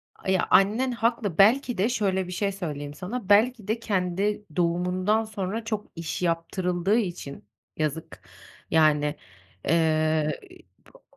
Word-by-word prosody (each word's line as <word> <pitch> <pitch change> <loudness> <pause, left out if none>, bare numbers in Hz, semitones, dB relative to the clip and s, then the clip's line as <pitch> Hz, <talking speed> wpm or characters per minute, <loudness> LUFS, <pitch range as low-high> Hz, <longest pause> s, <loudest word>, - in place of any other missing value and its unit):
A, - - -7
ya, 190 -1 +2
annen 220 +7 +4
haklı. 230 -6 -1
Belki 240 +5 +4
de 200 +5 +2
şöyle 190 -6 0
bir - - -7
şey 200 +2 -1
söyleyeyim 150 -7 -5
sana: 195 +5 -6
belki 215 +1 +3
de 220 +2 -1
kendi 200 0 -1
doğumundan 180 +5 +1
sonra 215 0 -4
çok 215 -2 -3
iş 165 0 -5
yaptırıldığı 180 +3 0
için, 175 -10 -4 0.3
yazık, 160 +1 -3 0.5
yani, 150 -2 +3 0.5
ııı, 155 -1 +2 0.6
bo - - -19
190 Hz, 130 wpm, -26 LUFS, 165-215 Hz, 0.6 s, annen